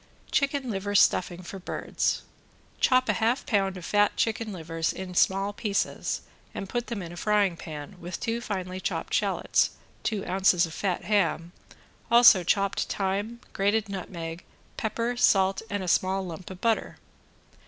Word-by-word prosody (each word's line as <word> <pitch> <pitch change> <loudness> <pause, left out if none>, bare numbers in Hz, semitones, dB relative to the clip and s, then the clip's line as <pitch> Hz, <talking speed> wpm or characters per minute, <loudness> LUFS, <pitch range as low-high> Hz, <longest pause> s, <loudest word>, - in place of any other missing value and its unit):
~CHICKEN 280 -3 +1
LIVER 205 0 -3
STUFFING 180 -2 +3
FOR 195 +2 -8
BIRDS~ 180 - -2 0.6
Chop 255 -1 +4
a - - +3
half 235 +4 +1
pound 195 -3 +1
of 175 - -8
fat 205 0 +2
chicken 225 -1 0
livers 165 -2 -2
in 185 -1 -7
small 195 +3 +2
pieces 205 -1 -1 0.3
and 195 - -4
put 240 +4 -3
them 215 -6 -4
in 170 - -8
a - - -9
frying 205 -1 +2
pan, 155 +3 -8
with 175 0 -6
two 230 0 -2
finely 185 -4 -4
chopped - - -3
shallots, - - +1 0.3
two 210 -4 -2
ounces 185 -2 +3
of 160 - -9
fat 190 0 -2
ham, 175 -5 +1 0.6
also 235 -6 +8
chopped 195 +2 +1
thyme, 205 +5 -2
grated 205 +2 +1
nutmeg, 170 -3 -6 0.3
pepper, 230 +2 -2
salt 195 -5 +3
and 200 -1 -2
a - - -5
small 190 +2 +1
lump 175 0 -8
of 185 -1 -9
butter. 225 +1 0
195 Hz, 155 wpm, -27 LUFS, 180-220 Hz, 0.6 s, also